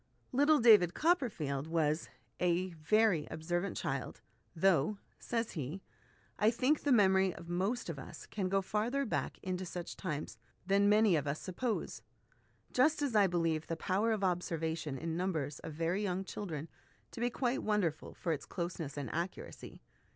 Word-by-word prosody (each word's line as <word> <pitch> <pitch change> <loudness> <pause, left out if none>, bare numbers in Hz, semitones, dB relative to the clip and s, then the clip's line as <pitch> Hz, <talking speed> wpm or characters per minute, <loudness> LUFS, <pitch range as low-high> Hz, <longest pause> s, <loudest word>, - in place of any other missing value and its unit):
Little 290 +3 +4
David 210 -7 +6
Copperfield 190 - +1
was 160 -1 0
" - - -39
a 180 +1 +1
very 170 +1 +2
observant 175 +4 -2
child, 135 -4 -3 0.4
though," 185 +2 +3 0.2
says 230 -1 -2
he, 155 +4 -5 0.3
" - - -34
I 215 - +5
think 255 +6 +2
the 290 - +1
memory 190 -5 +4
of 170 - -10
most 195 +8 -1
of 165 -5 -4
us 135 - -9
can 190 -3 -3
go 195 0 +2
farther 235 +8 0
back 220 - -2
into 185 -1 -2
such 175 -1 -6
times 150 - -4 0.3
than 200 +1 +4
many 210 -3 +5
of 150 -2 0
us 140 +2 -1
suppose; 215 +5 -3 0.7
just 295 +4 +3
as 265 -6 -1
I 205 -2 +6
believe 165 -3 0
the 165 - -3
power 200 +7 +1
of 215 -3 0
observation 165 -5 -1
in 165 +3 -3
numbers 160 -6 -2
of 160 - -7
very 165 +5 0
young 190 -2 -1
children 165 -6 -5 0.4
to - - -8
be 240 - +2
quite 245 +1 -1
wonderful 200 -8 -1
for 170 - -2
its 145 - -6
closeness 170 -5 -4
and 140 -2 -3
accuracy. 170 +3 -5
185 Hz, 165 wpm, -34 LUFS, 160-215 Hz, 0.7 s, David